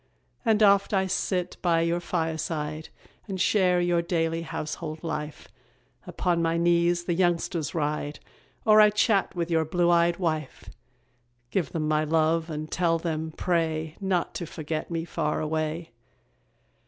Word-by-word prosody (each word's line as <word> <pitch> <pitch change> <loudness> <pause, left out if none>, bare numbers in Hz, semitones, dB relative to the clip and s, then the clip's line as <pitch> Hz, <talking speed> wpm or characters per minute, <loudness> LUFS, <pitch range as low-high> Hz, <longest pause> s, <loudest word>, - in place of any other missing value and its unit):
And 220 -3 +3
oft 200 0 +4
I 190 0 +2
sit 180 -1 -2
by 170 -2 +2
your 170 +1 +1
fireside, 160 -2 -3 0.4
And 190 -2 -4
share 185 -1 +3
your 175 -1 +2
daily 165 -1 -1
household 155 0 -5
life; 150 -2 -5 0.6
Upon 175 -2 0
my 165 0 +1
knees 170 0 +2
the 175 - -1
youngsters 170 -3 0
ride, 150 -1 -2 0.5
Or 215 -1 +7
I 210 - +7
chat 210 -2 +1
with 170 -1 -2
your 160 -1 +3
blue 175 +2 +1
eyed 170 0 +3
wife. 155 -6 -3 0.8
Give 175 -8 -1
them 155 -2 -2
my 155 0 +2
love, 160 +1 +1
and 155 0 -5
tell 170 -2 +2
them, 160 -1 -3
pray, 160 -3 -1
Not 190 -3 0
to 170 - -5
forget 155 0 -4
me 165 -1 -3
far 155 -3 -1
away. 155 0 -2
165 Hz, 145 wpm, -26 LUFS, 155-175 Hz, 0.8 s, Or